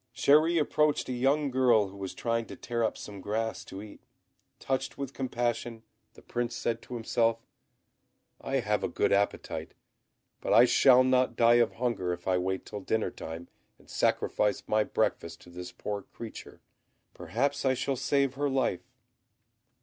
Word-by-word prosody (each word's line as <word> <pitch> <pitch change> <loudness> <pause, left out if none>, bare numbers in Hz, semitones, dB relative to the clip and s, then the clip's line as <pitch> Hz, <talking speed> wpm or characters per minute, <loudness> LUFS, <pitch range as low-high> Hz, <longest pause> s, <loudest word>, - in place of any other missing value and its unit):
Chéri 155 +6 +4
approached 150 -2 +1
a - - -1
young 135 +3 +1
girl 120 -6 +3
who 95 - -13
was 95 -1 -6
trying 115 -1 -1
to - - -8
tear 120 -1 -2
up 110 - 0
some 100 -2 -9
grass 110 +3 -2
to 95 +2 -8
eat; 105 - -12 0.6
touched 135 0 -3
with 140 -1 -5
compassion, 120 -3 -2 0.3
the - - -16
Prince 120 0 -3
said 115 0 -2
to 125 - -8
himself, 115 0 0 1.0
"I - - -1
have - - 0
a - - +1
good - - 0
appetite, 100 +1 -1 0.6
but - - -1
I 120 - +8
shall 130 0 +6
not 130 -2 +2
die 120 0 +6
of 120 - +1
hunger 115 -7 -1
if 85 +1 -9
I 90 -1 +2
wait 95 +1 -2
till 105 - -7
dinner 110 +2 -1
time 80 +2 -8 0.3
and - - -23
sacrifice 105 -1 +1
my 110 0 +2
breakfast 85 -4 -1
to 90 - -15
this 90 +1 -8
poor 100 +3 -5
creature; 110 +3 -10 0.5
perhaps 140 +5 -1
I 130 -1 +2
shall 135 +2 -1
save 135 +1 +1
her 145 +1 -1
life." 130 -9 -1
115 Hz, 165 wpm, -29 LUFS, 105-130 Hz, 1.0 s, I